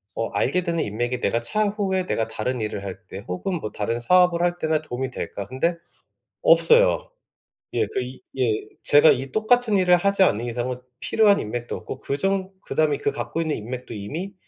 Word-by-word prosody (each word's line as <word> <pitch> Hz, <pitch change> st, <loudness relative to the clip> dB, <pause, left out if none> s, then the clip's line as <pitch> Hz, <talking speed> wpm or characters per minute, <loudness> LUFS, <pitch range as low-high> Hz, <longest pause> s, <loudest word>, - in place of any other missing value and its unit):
어 115 Hz, -, -2 dB
알게 135 Hz, -, 0 dB
되는 170 Hz, -2 st, -1 dB
인맥이 120 Hz, +4 st, -2 dB
내가 115 Hz, -, +1 dB
차후에 200 Hz, -, 0 dB
내가 115 Hz, -10 st, -1 dB
다른 115 Hz, +2 st, -3 dB
일을 105 Hz, -2 st, -3 dB
할 95 Hz, -1 st, -6 dB
때 95 Hz, +2 st, -9 dB
혹은 170 Hz, -, -3 dB
뭐 110 Hz, -, -5 dB
다른 115 Hz, +3 st, -2 dB
사업을 175 Hz, +6 st, +4 dB
할 175 Hz, 0 st, 0 dB
때나 155 Hz, -1 st, 0 dB
도움이 130 Hz, -2 st, -4 dB
될까? 100 Hz, -5 st, -5 dB
근데 130 Hz, -, -1 dB, 0.7 s
없어요. -, -, +5 dB, 0.6 s
예, -, -, +1 dB
그 -, -, -3 dB
이 125 Hz, +1 st, -8 dB, 0.2 s
예 125 Hz, -4 st, +2 dB, 0.3 s
제가 145 Hz, +2 st, +6 dB
이 135 Hz, +2 st, +1 dB
똑같은 220 Hz, 0 st, +2 dB
일을 180 Hz, -1 st, +5 dB
하지 200 Hz, +2 st, +1 dB
않는 120 Hz, -, +3 dB
이상은 120 Hz, +1 st, -3 dB, 0.2 s
필요한 210 Hz, -2 st, +3 dB
인맥도 120 Hz, +3 st, -4 dB
없고 130 Hz, -, -8 dB
그 140 Hz, -, -3 dB
정 195 Hz, +3 st, -1 dB
그다음에 150 Hz, -2 st, +1 dB
그 145 Hz, -, 0 dB
갖고 155 Hz, +3 st, -3 dB
있는 160 Hz, -2 st, -1 dB
인맥도 120 Hz, +2 st, -6 dB
이미 160 Hz, -, -5 dB
145 Hz, 350 characters per minute, -23 LUFS, 120-185 Hz, 0.7 s, 제가